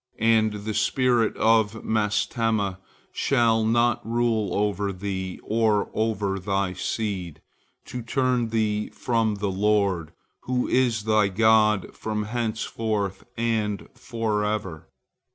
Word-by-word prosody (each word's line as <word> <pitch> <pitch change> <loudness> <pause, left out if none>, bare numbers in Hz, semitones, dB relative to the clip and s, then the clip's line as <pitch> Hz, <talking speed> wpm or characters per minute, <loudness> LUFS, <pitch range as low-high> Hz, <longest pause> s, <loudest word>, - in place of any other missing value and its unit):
And 110 -1 +3
the 110 - -2
spirit 120 -1 +2
of 110 -1 +2
Mastema 105 -2 0 0.3
shall 115 -4 +2
not 120 +1 +2
rule 115 -2 0
over 100 -1 0
thee 95 -1 -4
or 110 -2 +1
over 105 -3 -1
thy 95 0 -1
seed, 95 -4 -3 0.5
to 125 - -6
turn 125 0 0
thee 105 -2 0
from 115 -3 0
the 100 -1 -2
Lord, 100 -4 +1 0.3
who 125 0 0
is 120 -4 +1
thy 110 -1 +3
God 105 0 +3
from 105 -1 -3
henceforth 110 -3 -2
and 110 -3 -1
forever. 105 -7 -3
110 Hz, 110 wpm, -25 LUFS, 100-115 Hz, 0.5 s, And